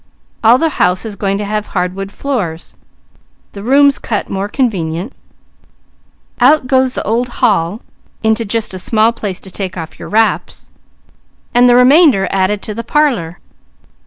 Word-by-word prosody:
All 230 +3 +6
the 320 +1 -1
house 180 +4 +2
is 215 -2 -5
going 195 0 -1
to 205 - -4
have 210 +1 -3
hardwood 190 +1 -3
floors, 200 - -4 0.8
the 200 - -9
rooms 280 +5 +3
cut 215 - -3
more 195 +1 -3
convenient; 190 - -2 1.3
out 265 +3 +4
goes 260 0 +1
the - - -2
old 235 +3 0
hall 205 -4 0 0.4
into 220 +1 +1
just 225 -1 -2
a 185 - -5
small 220 +4 +2
place 205 -5 -5
to 190 - -11
take 185 -1 -5
off 165 -1 -8
your - - -8
wraps, 225 +1 -1 0.8
and 245 +1 +5
the 240 - +5
remainder 255 - +5
added 195 +1 0
to 215 - -4
the 230 +2 -5
parlour. 235 - 0
215 Hz, 155 wpm, -14 LUFS, 195-245 Hz, 1.3 s, All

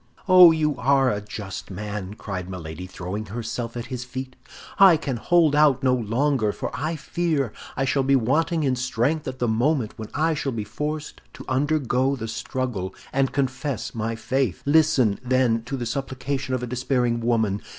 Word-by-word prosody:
"Oh, 185 -2 +9
you 155 -2 +1
are 135 +1 +3
a 105 - -2
just 100 -2 -7
man!" 105 0 -5
cried 95 -4 -6
Milady, 90 -1 -7
throwing 95 +4 -5
herself 115 +2 -4
at 120 - -4
his 125 0 -3
feet. 130 0 -7 0.4
"I 190 -4 +8
can 140 -5 -3
hold 165 +4 +3
out 145 -3 +4
no 130 -1 +4
longer, 120 0 +1
for - - -5
I 155 +4 -2
fear 155 -6 -1 0.2
I 135 - +1
shall 135 +1 +1
be 135 +1 +3
wanting 150 +7 +1
in 130 -2 +1
strength 125 +5 -1
at 130 0 -4
the 125 - 0
moment 120 +2 +1
when 110 - -6
I 160 +3 +2
shall 140 -3 -2
be 110 -2 -3
forced 150 +8 -5
to - - -10
undergo 135 -1 +1
the 115 -4 -5
struggle, 110 -4 -3 0.2
and 135 -1 +1
confess 135 0 -2
my 115 0 -2
faith. 125 -3 -1
Listen, 145 -8 +3
then, 125 -2 +2
to 135 +2 -4
the 120 - -3
supplication 130 0 -3
of 125 - -3
a - - 0
despairing 125 -1 0
woman. 110 -4 +1
130 Hz, 180 wpm, -24 LUFS, 115-140 Hz, 0.4 s, Oh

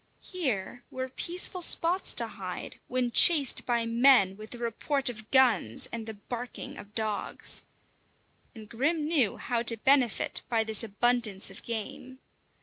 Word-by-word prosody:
Here 245 - -4
were 260 0 -6
peaceful 355 +5 -4
spots 345 +2 +3
to - - +2
hide - - -8
when 250 -1 -2
chased 290 -1 +5
by 235 -2 0
men 230 -4 +3
with 215 +2 -12
the 245 - -8
report 250 +4 -1
of 220 -2 -10
guns 240 - +3
and 225 -1 -7
the 220 - -7
barking 245 +4 -8
of 205 +1 -13
dogs. 215 -2 +1 0.9
And 220 -2 -12
Grim 295 +8 -2
knew 285 -10 +1
how 240 -2 -3
to 230 0 +2
benefit 260 -1 +1
by 225 -2 +1
this 220 -1 +1
abundance 220 -2 +1
of 195 - -11
game. 235 +3 -7
240 Hz, 145 wpm, -28 LUFS, 220-265 Hz, 0.9 s, chased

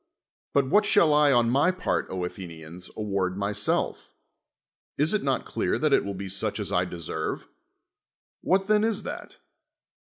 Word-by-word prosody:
But 140 -2 +3
what 205 +10 +4
shall 155 -3 +4
I, 150 -1 +5
on 120 -2 +3
my 140 +7 +4
part, 185 - -1
Athe 90 0 -4
nians, 80 +2 -10
award 100 -3 -1
myself? 100 +1 -1 0.9
Is 150 +6 +3
it 215 - +1
not 135 -2 -1
elt»ar - - -1
that - - +1
it - - +4
will 100 0 -4
be 95 +1 -5
such 95 0 -3
as - - -3
I - - +2
deserve? 85 -3 -4 1.0
Wliat 190 +1 +2
then 210 +1 +3
is 220 -1 0
that? - - -7
110 Hz, 160 wpm, -26 LUFS, 95-155 Hz, 1.0 s, I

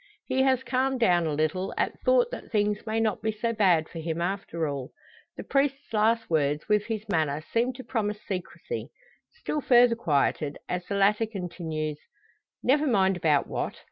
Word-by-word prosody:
He 260 - +1
has 260 -1 +3
calmed 260 +1 0
down 175 -7 +3
a 155 - -1
little, 155 +5 -1
at - - -1
thought - - +3
that - - -7
things 210 0 0
may 220 +1 0
not 220 -2 0
be 220 - 0
so 230 +2 -2
bad 180 -7 +3
for 165 - -8
him 160 0 -3
after 170 -3 -2
all. 140 -3 -4 0.5
The - - -5
priest's 275 -2 0
last 225 +1 +2
words, 150 -2 0
with 210 -1 +2
his 220 -2 -4
manner, 155 -6 0
seem 235 +2 +2
to 260 +1 -9
promise 215 -4 -2
secrecy. 190 - -5 0.4
Still 305 -10 -4
further 245 -2 +5
quieted 145 -6 0
as 180 0 -2
the 200 - -2
latter 210 +3 +3
continues: 165 -7 -4 0.6
"Never 290 +4 +3
mind 195 -6 +3
about 155 -5 +2
what. - - -3
210 Hz, 175 wpm, -27 LUFS, 165-235 Hz, 0.6 s, further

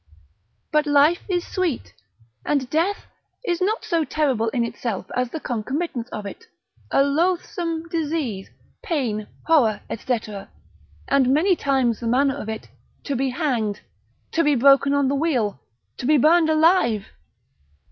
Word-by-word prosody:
But 300 0 +2
life 290 +4 +4
is 355 -2 0
sweet, 355 -9 -2 0.5
and 280 -3 0
death 345 +6 0 0.4
is 350 -3 -1
not 430 +4 0
so 340 -6 +1
terrible 265 -8 0
in 235 0 0
itself 230 -4 -4
as 250 -1 0
the 320 - -5
concomitants 250 +1 -3
of 210 -3 -6
it, 445 - -8 0.4
a 275 - +4
loathsome 335 +2 -1
disease, 300 - -2 0.3
pain, 230 - -2 0.2
horror, 245 -11 +3
&c. 240 +1 -1 0.9
and 275 -2 +3
many 350 +7 +3
times 265 -7 +1
the 235 - -4
manner 270 +4 +3
of 255 -6 -6
it, 220 0 -5 0.4
to 280 - -2
be 265 +1 0
hanged, 245 -7 -1 0.5
to 330 - +2
be 295 -2 +3
broken 275 +2 +5
on 285 -1 +2
the 275 - +1
wheel, 260 - 0 0.4
to 245 - -4
be 305 0 +5
burned 320 +4 +4
alive. 310 - +3
280 Hz, 145 wpm, -23 LUFS, 240-325 Hz, 0.9 s, broken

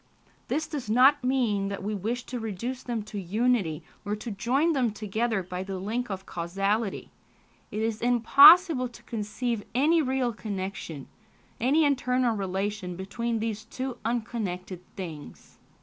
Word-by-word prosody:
This 315 - -1
does 290 -8 -5
not 255 +5 +5
mean 240 -7 +1
that 200 -1 -5
we 210 +2 -2
wish 225 +5 -2
to 250 -1 -5
reduce 230 +4 -4
them 235 -3 -3
to 210 -1 -6
unity, 195 -4 0 0.2
or 205 0 -2
to 220 +2 -6
join 260 +11 +1
them 255 -5 +2
together 215 0 -1
by 180 +1 -5
the 190 0 -5
link 225 +6 -3
of 190 -1 -5
causality... 195 +5 -2 0.6
it 215 - -3
is 225 -1 -2
impossible 255 - +7
to 240 0 -15
conceive 225 0 -3
any 315 +6 +4
real 260 -3 0
connection, 190 - -5 0.5
any 285 +7 +3
internal 250 -4 +1
relation 195 -1 -3
between 230 +5 -3
these 220 -1 -3
two 255 +2 -5
unconnected 215 -6 -3
things." 165 -6 -9
225 Hz, 145 wpm, -27 LUFS, 195-250 Hz, 0.6 s, impossible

